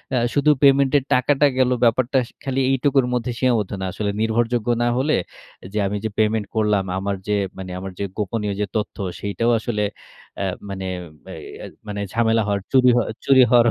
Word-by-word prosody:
আ - - +2 0.2
শুধু 145 +1 +3
payment 140 -1 +5
এর 140 - 0
টাকাটা 135 +3 +3
গেলো 130 -1 +3
ব্যাপারটা 120 +3 +2
সা - - -20
খালি 135 -1 -1
এইটুকুর 135 0 +2
মধ্যে 125 0 -1
সীমাবদ্ধ 115 -6 +1
না। - - -2
আসলে 105 -1 -2
নির্ভরযোগ্য 115 +1 0 0.2
না - - +2
হলে 145 +4 +2 0.6
যে - - -3
আমি 105 +1 -2
যে - - 0
payment 110 0 +2
করলাম। 105 -3 +2
আমার 100 +1 -2
যে 105 - +1 0.2
মানে 95 -1 -7
আমার 95 +1 -6
যে - - -1
গোপনীয় 105 0 -2
যে 105 - +1
তথ্য, 110 +1 -2 0.2
সেটাও 115 +4 0
আসলে 110 -2 -2 0.6
এ - - 0 0.2
মানে 95 -1 -5 0.4
বে - - -10 0.3
এই - - -8 0.2
মানে 105 -1 -4
ঝামেলা 115 -1 +2
হওয়ার, 100 -1 0
চুরি 130 -2 +5
হওয়া 120 - +2 0.2
চুরি 135 -1 +6
হওয়ার 120 0 +5
115 Hz, 190 wpm, -21 LUFS, 105-130 Hz, 0.6 s, চুরি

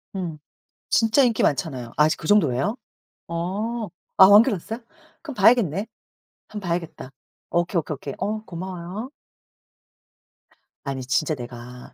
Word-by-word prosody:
음. 175 -5 -4 0.5
진짜 225 +4 +4
인기 235 -4 +2
많잖아요. 135 -6 -1
아직 155 +1 +4
그 155 - -7
정도예요? 190 - +3 0.5
어 205 +7 -3 0.3
아 190 - +11
완결 205 +2 +7
났어요? 220 +5 -6 0.4
그럼 295 -5 -8
봐야겠네. 205 -3 +4 0.6
한번 205 -4 -7
봐야겠다. 165 -6 -3 0.4
오케이, 175 +2 0
오케이, 155 - -6
오케이. 140 0 -7
어 215 +1 -2
고마워요. 185 +5 -6 1.7
아니 135 -2 -4
진짜 135 +5 +1
내가 125 0 -10
175 Hz, 275 characters per minute, -24 LUFS, 150-215 Hz, 1.7 s, 아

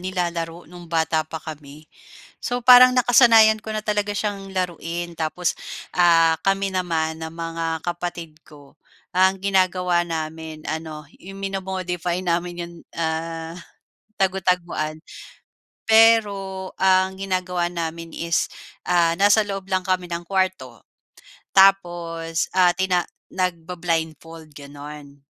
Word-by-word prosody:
nilalaro 175 -2 -3
no'ng 175 0 -12
bata 160 -1 +1
pa 160 0 -7
kami. 150 -1 -10 0.6
So, 245 0 -2
parang 255 0 +9
nakasanayan 230 -3 +6
ko - - -10
na 215 - -2
talaga 210 -1 -1
siyang 200 -2 -3
laruin. 175 -1 -3
Tapos 165 +2 -1 0.4
ah, 165 -2 +5
kami 195 0 +1
naman 165 -3 -1
ng 160 0 -6
mga 165 0 -5 0.2
kapatid 175 -2 -5
ko, 145 -1 -17 0.4
ang 190 +1 +3
ginagawa 185 -2 +1
namin 160 -1 -6
ano, 155 -1 -5 0.2
'yong 195 +2 -10
mino-modify 185 -2 -3
namin 175 0 -1
'yong 170 0 -11 0.2
ah, 165 0 -3 0.7
tagu-taguan. 180 -5 0 0.9
Pero 200 -4 +3
ang 190 0 +3
ginagawa 185 -2 -1
namin 165 -1 -5
is 170 0 0 0.4
ah, 170 -2 +3
nasa 205 +3 +4
loob 195 -1 -6
lang 185 -1 0
kami 185 -1 -1
ng 170 0 -4
kuwarto. 185 - -2 0.7
Tapos 175 -4 +2
ah, 180 -1 +5
tina 185 -1 +1 0.3
nagba-blindfold 165 -3 -3
gano'n. 145 0 -11
175 Hz, 115 wpm, -22 LUFS, 165-190 Hz, 0.9 s, parang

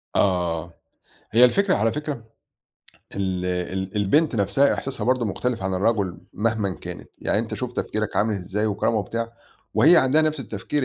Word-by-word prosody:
آه. 85 -3 +1 0.6
هي 120 +3 +7
الفكرة 190 +9 +3
على 115 +1 +2
فكرة 150 0 -3 1.0
ال 95 -2 -2
ال 95 +2 -3
البنت 135 +10 +2
نَفْسها 105 +8 +3
إحساسها 130 -5 -4
برضه 125 0 +2
مختلف 115 +2 -2
عن 95 0 -1
الرجل 100 -2 0
مهمًا 110 -1 0
كانت. - - -9
يعني - - 0
أنت 115 0 -2
شوف 125 -1 -4
تفكيرك 110 -3 -3
عامل 110 +1 +2
إزاي 100 +3 -2
وكرامة 105 +2 0
وبتاع 115 +3 -3 0.4
وهي 170 +4 +7
عندها 140 +2 +4
نَفْس 155 -2 0
التفكير 125 +5 -3
110 Hz, 155 wpm, -24 LUFS, 95-125 Hz, 1.0 s, هي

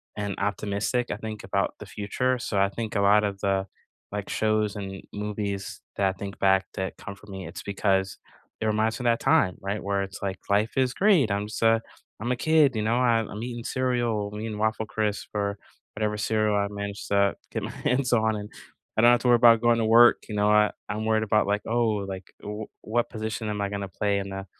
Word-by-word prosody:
and 100 -2 -3
optimistic, 100 +4 -1
I - - -2
think, 110 -1 -6
about 100 - -1
the 105 - -8
future 120 +6 -1
so, 105 -4 -1
I 100 0 +3
think 110 +1 -5
a 100 - +2
lot 105 +1 +5
of 100 -1 -3
the, 95 -1 +1 0.5
like, 105 -1 -4
shows 110 -1 +1
and 95 -1 -6
movies 105 -1 -4 0.2
that 100 -1 +3
I - - -3
think 100 +1 -7
back 95 0 +3
that 95 0 -4
comfort 100 +1 -10
me, 95 -3 -7
it's 85 - -8
because 95 -1 0 0.4
it - - 0
reminds 110 +2 +1
me - - -4
of - - +6
that 115 - 0
time, 90 - +3
right? 100 +2 -3
Where 100 0 0
it's, 95 +1 -8
like, 95 -2 -3
"Life 105 +4 +1
is 130 -1 +2
great, 180 - +4
I'm 100 +1 -1
just 110 - -6
a 115 0 +4 0.4
I'm 120 +3 -1
a - - +2
kid, 150 0 +3
you 110 - 0
know? 110 +2 +1
I 120 -2 +3
I'm 110 0 -5
eating 120 -1 -5
cereal, 120 -5 0
I'm 105 - -5
eating 110 -1 -4
Waffle 110 +1 0
Crisp, 110 -1 -2
or 100 0 -1 0.4
whatever 105 0 -1
cereal 110 0 +1
I 100 0 +1
managed 100 0 -5
to 100 -1 +3 0.2
get - - -3
my - - -4
hands 125 0 0
on, 110 -2 +3
and 105 0 -6 0.5
I - - +5
don't 120 +1 +7
have 120 - +3
to - - 0
worry 120 - +7
about 115 -1 +6
going 120 -1 +3
to 115 - +1
work," 115 +2 +6
you 105 - -4
know? 105 0 +2
I 105 0 +5 0.2
I'm 105 +1 -2
worried 110 0 +2
about, 105 0 +2
like, 105 +1 +1
"Oh, 110 -3 +1
like, 95 -1 -8
w 105 +1 -6
what 120 +2 -1
position 110 -1 -4
am 105 -1 -2
I 100 - -1
gonna 100 -1 -4
play 100 +1 0
in 100 0 -5
the 95 0 -6
105 Hz, 230 wpm, -26 LUFS, 100-115 Hz, 0.5 s, don't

